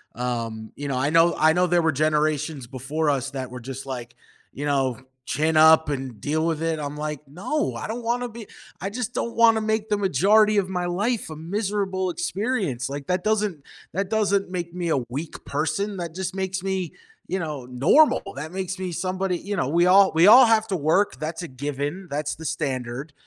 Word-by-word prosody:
Um, 115 -3 -4
you 145 - -5
know, 135 -2 -1
I 135 +3 +1
know 165 +1 +5
I 160 +1 +5
know 180 +1 +2
there 175 0 +3
were 160 - +3
generations 150 -2 0
before 140 +5 -2
us 140 -1 -1
that 130 -3 -5
were 125 - -7
just, 135 +2 -7
like, 120 -3 -6 0.4
you 145 - -5
know, 135 -4 +1 0.3
"Chin 155 +3 0
up 160 0 +7
and 130 -6 -4
deal 155 +7 -1
with 165 -1 -1
it," 165 -1 0
I'm 145 0 -5
like, 150 -1 -4
no, 195 - -2
I - - -5
don't 235 +2 -5
wanna 245 +2 -1
be 230 -2 -10 0.3
I 195 - -2
just 245 +2 -4
don't 235 - -3
wanna 225 -1 +5
make 220 0 -1
the 210 - +2
majority 205 +4 +4
of 195 -2 +2
my 180 -2 -2
life 205 +6 -1
a 155 - -7
miserable 190 +2 -2
experience, 175 - -2
like, 140 0 -6
that 180 0 0
doesn't 210 -8 0 0.3
that 195 +2 -2
doesn't 200 -3 +1
make 175 -2 -4
me 175 -2 -3
a 155 - +2
weak 150 +6 -6
person 160 +8 -2
that 170 -2 -5
just 190 0 -4
makes 190 -1 -2
me, 190 -3 -2 0.4
you 190 - -1
know, 150 -7 -5
normal, 140 - +4
that 155 +4 -6
makes 190 0 -4
me 185 -1 -3
somebody 185 +1 -1
you 205 +3 -4
know, 135 - -1
we 170 +3 +3
all 190 +1 +6
we 165 +2 +6
all 245 +4 +10
have 225 -1 +3
to 195 - 0
work, 170 +6 +1
that's 160 +3 -4
a - - -5
given, 145 +7 -4
that's 145 +1 -2
the 160 +1 -10
standard, 135 -2 -3
165 Hz, 205 wpm, -24 LUFS, 145-195 Hz, 0.4 s, all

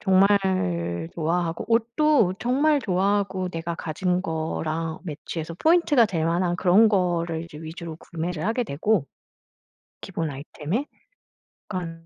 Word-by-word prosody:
정말 185 - +2
좋아하고 165 +1 -1
옷도 235 -1 +3
정말 280 +5 +2
좋아하고 190 -1 0
내가 165 0 -4
가진 180 +3 -1
거랑 160 -1 -3
매치해서 160 0 -5
포인트가 315 - +4
될 165 -6 -1
만한 175 +1 +1
그런 195 +5 +5
거를 170 -4 0
이제 165 - -12
위주로 160 0 -7
구매를 170 0 -5
하게 230 +3 0
되고 175 +1 0 1.0
기본 165 -5 -3
아이템에 150 - -4 0.8
약간 165 -4 -5
175 Hz, 275 characters per minute, -25 LUFS, 160-205 Hz, 1.0 s, 그런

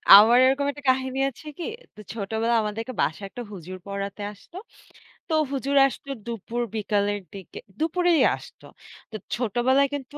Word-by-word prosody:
আমার 225 +4 +8
এরকম 270 +2 +2
একটা 290 +1 -12
কাহিনী 260 0 +1
আছে 275 +4 -15
কি? 345 - -5 0.3
তো - - -15
ছোটবেলায় 225 +2 0
আমাদেরকে 225 +4 -4
বাসায় 195 +6 -1
একটা 245 +3 -7
হুজুর 185 -1 -8
পড়াতে 200 +1 -4
আসতো। 335 - -14 0.7
তো 325 - -2 0.2
হুজুর 275 +1 -1
আসতো 275 +1 -9 0.2
দুপুর 235 +1 -4
বিকালের 205 -1 0
দিকে, 195 -3 -9 0.2
দুপুরেই 340 +1 +2
আসতো। - - -14 0.5
তো - - -7 0.2
ছোটবেলায় 250 +4 +2
কিন্তু 285 +1 -6
235 Hz, 145 wpm, -25 LUFS, 205-275 Hz, 0.7 s, আমার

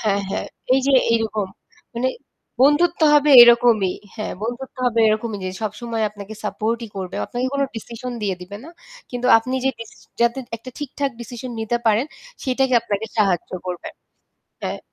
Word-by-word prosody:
হ্যাঁ, 200 -2 +1
হ্যাঁ, - - -2 0.3
এই 270 - +3
যে 280 - +3 0.2
এইরকম 220 -3 0 0.5
মানে 245 +2 0 0.5
বন্ধুত্ব 325 +6 +4
হবে 295 0 +5
এরকমই। 235 -5 +5 0.2
হ্যাঁ, 215 -2 -4
বন্ধুত্ব 245 +5 -5
হবে 230 -2 +2
এরকমই 215 0 -1
যে - - -2
সবসময় 220 +2 -3
আপনাকে 210 0 -9
সাপোর্ট 220 +2 -1
ই - - -14
করবে। 185 -2 -5
আপনাকে 245 +1 -2
কোনো 280 0 +2
ডিসিশন 235 +3 -6
দিয়ে 200 -2 0
দিবে 195 +3 -8
না। - - -10 0.4
কিন্তু 245 0 -2
আপনি 255 +3 -4
যে 265 - +3
ডিস 230 -1 -8 0.3
যাতে 235 +2 +2 0.2
একটা 230 +3 -11
ঠিকঠাক 285 -1 -3
ডিসিশন 245 +2 -7
নিতে 220 +2 0
পারেন 220 +4 +3 0.4
সেটাকে 260 0 +1
আপনাকে 220 -1 -3
সাহায্য 195 -5 +1 0.2
করবে। 180 -1 -5 0.7
হ্যাঁ। - - -3
230 Hz, 160 wpm, -21 LUFS, 215-255 Hz, 0.7 s, হবে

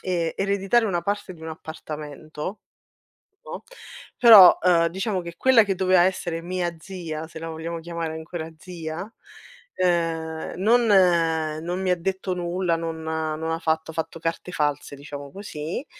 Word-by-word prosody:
e 170 -3 -1
ereditare 200 +4 +2
una 175 -4 -1
parte 205 -2 -3
di 160 - -15
un 160 - -6
appartamento, 155 +2 -7 0.9
no, - - -7 0.5
però, 220 -7 +10
ehm, 170 -2 +4
diciamo 190 +1 -2
che 170 -1 -8
quella 255 -1 +6
che 195 -2 -1
doveva 185 -1 +4
essere 175 -2 0
mia 175 0 -3
zia, 165 -4 -6
se 160 - -9
la 165 - -6
vogliamo 165 +1 -5
chiamare 165 -1 -4
ancora 160 0 -6
zia, 165 -1 -6 0.7
uhm, 165 -3 -1
non 230 +6 +4 0.8
non 175 +3 -3
mi 190 - -1
ha 180 - +4
detto 190 +1 -2
nulla, 175 0 -1
non 165 -1 -4
non - - -8
ha 155 -1 -2
non 160 +1 -3
ha 165 - -1
fatto 160 -1 -1
ha - - -15
fatto 160 +1 -4
carte 165 +2 -3
false, 145 -3 -2
diciamo 140 0 -9
così. 175 - -6
170 Hz, 160 wpm, -24 LUFS, 160-185 Hz, 0.9 s, però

